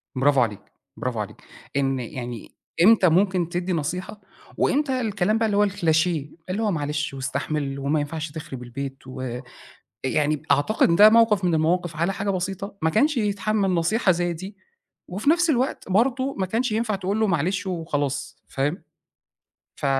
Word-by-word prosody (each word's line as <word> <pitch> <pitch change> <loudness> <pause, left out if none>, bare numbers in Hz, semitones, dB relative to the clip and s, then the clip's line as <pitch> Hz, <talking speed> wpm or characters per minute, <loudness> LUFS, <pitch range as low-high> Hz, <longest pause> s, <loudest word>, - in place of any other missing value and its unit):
برافو 135 0 +3
عليك، 105 -4 -1 0.4
برافو - - -3
عليك. - - -5 0.4
إن 135 -1 +1
يعني 120 -1 -6 0.3
إمتى 205 -3 +6
ممكن 180 0 +2
تدّي 180 +1 -2
نصيحة، 180 +6 -3 0.4
وإمتى 270 -3 +1
الكلام 210 -1 +1
ده 225 - +1
اللي 205 -2 +1
هو 205 0 +4
الcliché 170 -4 +2 0.4
اللي 195 +4 -1
هو 210 - +1
معلش 150 -3 -2
واستحمل 140 +1 -3
وما 140 +3 0
ينفعش 150 +1 -4
تخرب 150 -5 -7
البيت 135 +2 -7
وآآ 130 -1 -5 0.6
يعني 150 +2 +1
أعتقد 170 +1 +3
ده 210 +4 +9
موقف 225 -4 +4
من 175 -2 +2
المواقف 170 +2 +1
على 170 +5 +1
حاجة 200 +1 -2
بسيطة 195 +2 -3
ما 160 - +3
كانش 285 - +2
يتحمّل 210 -2 0
نصيحة 185 +4 +2
زي 175 0 -1
دي، 190 +5 -8 0.5
وفي 205 +10 0
نفس 345 +1 +3
الوقت 260 -5 -1
برضه 260 +6 +1
ما 190 - 0
كانش 225 +5 -1
ينفع 220 0 0
تقول 195 +2 -2
له 220 - +3
معلش 185 +2 0
وخلاص، 145 -6 -3
فاهم؟ 145 +6 -2 0.9
ف - - -3
175 Hz, 160 wpm, -24 LUFS, 145-210 Hz, 0.9 s, ده